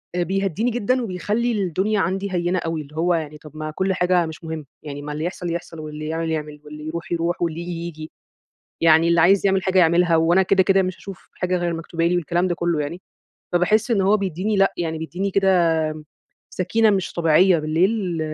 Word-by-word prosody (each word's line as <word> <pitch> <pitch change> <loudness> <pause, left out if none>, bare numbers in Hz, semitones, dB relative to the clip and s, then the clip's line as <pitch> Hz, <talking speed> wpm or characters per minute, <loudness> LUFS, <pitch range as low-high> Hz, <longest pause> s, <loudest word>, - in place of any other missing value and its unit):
آآ 175 - +1
بيهدّيني 195 +5 -1
جدًا 245 +3 0
وبيخلّي 215 +4 -1
الدنيا 200 +1 0
عندي 190 +3 -1
هينة 175 +1 0
أوي، 165 -1 -3
اللي 150 +1 -13
هو 175 +2 +1
يعني 155 -2 -3
طَب 150 -1 -13
ما 155 0 -4
كُل 190 +4 -1
حاجة 180 -1 +2
مش 160 +1 -9
مهم، 160 -2 -5 0.2
يعني 145 -1 -7
ما 150 0 -6
اللي 155 +2 -4
يحصل 175 -1 -4
يحصل، 165 -1 -6
واللي 155 0 -6
يعمل 165 +1 -2
يعمل، 150 -1 -4
واللي 150 0 -9
يروح 170 +2 -6
يروح، 170 +1 -1
واللي 170 -1 -1
ييجي 175 +1 -5
ييجي. 165 -2 -7 0.7
يعني 165 0 +5
اللي 170 -1 +4
عايز 195 +3 +4
يعمل 190 -1 +2
حاجة 190 0 +2
يعملها 170 0 +4
وأنا 170 +3 +4
كده، 190 0 +3
كده 195 +1 +3
مش 185 -1 -3
هاشوف 195 -2 -11
حاجة 180 0 -1
غير 175 -1 -1
المكتوبة 165 0 -3
لي 175 +1 +2
والكلام 175 +1 0
ده 175 - -1
كلّه 170 -2 -1
يعني. 170 +6 -5 0.5
فباحس 215 +7 +2
إن 215 - +3
هو 195 +2 +4
بيدّيني 195 +1 -2
لأ، 195 0 +3
يعني 160 -2 -3
بيدّيني 180 +5 -3
كده 165 -5 +1 0.5
سكِينة 220 +4 +2
مش 190 -3 -1
طبيعية 170 +2 +4
بالليل، 175 +3 0
175 Hz, 205 wpm, -22 LUFS, 160-190 Hz, 0.7 s, يعني